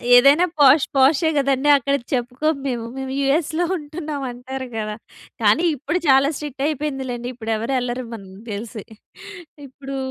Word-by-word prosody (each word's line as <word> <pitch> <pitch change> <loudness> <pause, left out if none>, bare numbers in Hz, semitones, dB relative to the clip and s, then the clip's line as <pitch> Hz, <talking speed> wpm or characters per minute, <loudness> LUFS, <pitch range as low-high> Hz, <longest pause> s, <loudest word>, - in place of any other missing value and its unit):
ఏదైనా 280 +8 +6
పోష్ 280 +1 +6
పోషే 280 +5 +4
గదండీ. 275 0 +1
అక్కడ 275 +1 0 0.2
చెప్పుకోము 260 +5 -1
మేము. 240 -3 -3
మేము 265 0 -4
యూఎస్‌లో 315 +4 +1
ఉంటున్నామంటారు 270 -5 -6
గదా! 215 -1 -3 0.5
కానీ 215 +11 +4
ఇప్పుడు 295 +6 -2
చాలా 270 +1 +5
స్ట్రిక్టయిపోయింది 290 -1 -3
లెండి. 240 0 -5
ఇప్పుడెవరెళ్ళరు 240 +2 -2
మనకి 195 -2 -12
తెలిసి. 215 0 -6 0.8
ఇప్పుడూ 275 +1 -8
270 Hz, 120 wpm, -21 LUFS, 245-290 Hz, 0.8 s, ఏదైనా